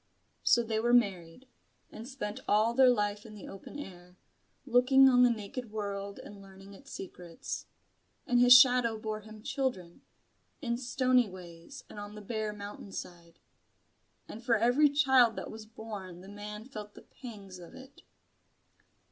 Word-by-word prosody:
So 235 - +4
they 220 -1 -1
were 240 +2 +3
married; 195 0 0 0.4
and 225 +2 -9
spent 240 -6 -5
all 215 +3 +3
their 260 +1 +6
life 210 -3 0
in 215 -1 -12
the 205 - -10
open 195 +8 -10
air, 180 -8 -11 0.5
looking 265 +1 +5
on 250 -1 +5
the 250 - +6
naked 230 +2 -5
world 200 -2 -5
and 205 -1 -11
learning 195 0 -14
its 275 +7 -15
secrets. 180 -3 -7 0.6
And 245 -1 +2
his 245 0 +9
shadow 245 -3 +4
bore 215 0 -4
him 215 0 -13
children, 210 -12 -3 0.6
in 235 -5 -2
stony 255 -2 +2
ways 180 +6 -11
and 210 - -10
on 205 0 -8
the 210 - -9
bare 215 0 -3
mountain 205 -1 -9
side. 170 -3 -9 0.9
And 225 - -10
for 235 -1 +3
every 245 +7 +4
child 265 -5 +4
that - - -6
was 220 0 -10
born 210 -6 -9
the 190 - -12
man 210 +1 -8
felt 210 -5 -9
the - - -13
pangs 200 -7 -11
of 175 - -13
it. 265 +1 -14
215 Hz, 160 wpm, -30 LUFS, 200-245 Hz, 0.9 s, his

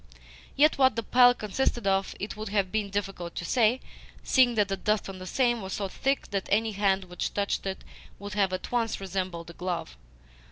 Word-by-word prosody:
Yet 300 0 +4
what 260 -3 +5
the 230 - -2
pile 245 +1 +6
consisted 235 +1 -1
of 195 0 +1
it 205 - -4
would 215 -1 -6
have 200 -2 0
been 215 -2 -1
difficult 195 -4 -4
to 170 - -4
say, 235 +5 +2 0.4
seeing 250 -3 +4
that 210 -2 +3
the 195 - -1
dust 210 +2 0
on 195 -1 -7
the 185 - -8
same 240 +1 +1
was 190 -1 -5
so 200 - -2
thick 270 +7 -2
that 195 -1 -2
any 220 +2 +2
hand 195 -1 +1
which 180 -1 -4
touched 200 -1 -1
it 190 - -4 0.3
would 200 0 -7
have 195 -2 +2
at 185 0 -5
once 230 -2 0
resembled 185 -3 -4
a - - -14
glove. 175 - -4
200 Hz, 205 wpm, -28 LUFS, 190-225 Hz, 0.4 s, pile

